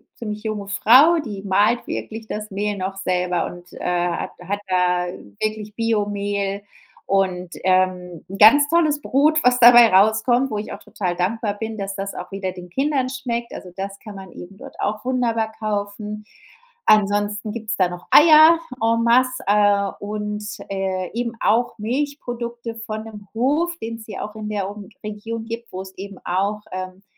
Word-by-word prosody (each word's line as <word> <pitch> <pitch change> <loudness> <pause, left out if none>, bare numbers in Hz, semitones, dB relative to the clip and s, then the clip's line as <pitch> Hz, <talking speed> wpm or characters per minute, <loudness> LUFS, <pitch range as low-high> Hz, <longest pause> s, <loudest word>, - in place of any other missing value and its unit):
ziemlich 210 -2 -6
junge 215 -2 -4
Frau, 260 - +6
die 200 -4 -6
mahlt 205 +4 +2
wirklich 220 0 -5
das 215 0 -5
Mehl 205 +1 -2
noch 190 +1 -4
selber 180 -2 0
und, 175 0 -12
äh, - - -10
hat 175 -1 -1
hat 200 +3 -3
da 180 -1 +1 0.3
wirklich 215 -1 -3
Bio-Mehl 205 -3 -1 0.4
und, 185 -2 0
ähm, 185 -2 +1
'n 195 - -6
ganz 260 +8 +7
tolles 310 -3 +2
Brot, 300 +3 +3
was 250 0 +4
dabei 240 -1 +9
rauskommt, 220 +6 +4
wo 215 - -2
ich 205 - -5
auch - - -8
total 180 -3 -3
dankbar 205 +3 -1
bin, 225 -1 -4
dass 195 -1 -4
das 195 0 -4
auch 180 - -7
wieder 195 -1 -4
den 180 -1 -11
Kindern 270 - 0
schmeckt. 240 -3 -4
Also, 180 - -9
das 195 +1 -6
kann 210 -2 -10
man 190 -2 -10
eben 180 +3 -11
dort - - -12
auch 210 +1 -2
wunderbar 230 -4 0
kaufen. 210 0 -4 0.6
Ansonsten 205 0 +2
gibt's 220 0 -3
da 185 -2 +3
noch 180 0 -9
Eier, 315 +1 +8 0.2
en 230 +1 +2
masse, 255 +2 +3
äh, 205 -1 +3
und, 210 0 -4 0.3
äh, 190 -2 -2
eben 235 0 -2
auch 235 +3 +1
Milchprodukte 240 -2 -4
von 220 -1 -6
'nem 210 -2 -11
Hof, 295 +9 +1
den's 225 0 -6
hier 210 -3 -6
auch 210 +1 -11
in 215 -1 -6
der 200 -2 -2
Um 205 -1 -9 0.2
Region 215 +2 -5
gibt, 230 +1 -7
wo 185 - -4
es 190 0 -10
eben 195 0 -8
auch 200 +4 -1
ähm, 185 +1 -6
210 Hz, 170 wpm, -21 LUFS, 195-230 Hz, 0.6 s, dabei